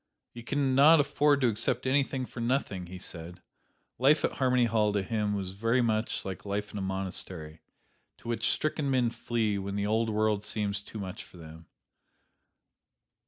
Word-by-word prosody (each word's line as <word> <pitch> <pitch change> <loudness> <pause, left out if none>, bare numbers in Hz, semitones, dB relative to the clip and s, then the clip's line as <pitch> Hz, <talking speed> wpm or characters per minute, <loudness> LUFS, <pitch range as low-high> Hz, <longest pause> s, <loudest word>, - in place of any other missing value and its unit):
"You 120 - -8
can 135 +2 0
not 150 +5 +7
afford 145 0 +3
to 125 - +4
accept 115 +3 0
anything 135 -1 +1
for 120 - -10
nothing," 115 -7 -1
he 90 +2 -8
said. 85 -1 -8 0.6
Life 140 +4 +4
at - - 0
Harmony 125 -3 +2
Hall 110 -2 +2
to 100 -1 0
him 105 0 -1
was 95 -2 -3
very 115 +5 +1
much 110 -1 0
like 95 -1 -6
life 105 +1 -3
in 105 - -5
a - - -3
monastery, 95 -4 -4 0.6
to - - -14
which 115 0 0
stricken 155 -2 0
men 125 -3 +2
flee 110 -4 -1
when 100 +1 -4
the 100 0 -1
old 110 +2 +1
world 105 -1 +1
seems 105 -2 -2
too 105 - -10
much 95 -3 -6
for - - -16
them. 80 0 -12
110 Hz, 175 wpm, -29 LUFS, 100-125 Hz, 0.6 s, not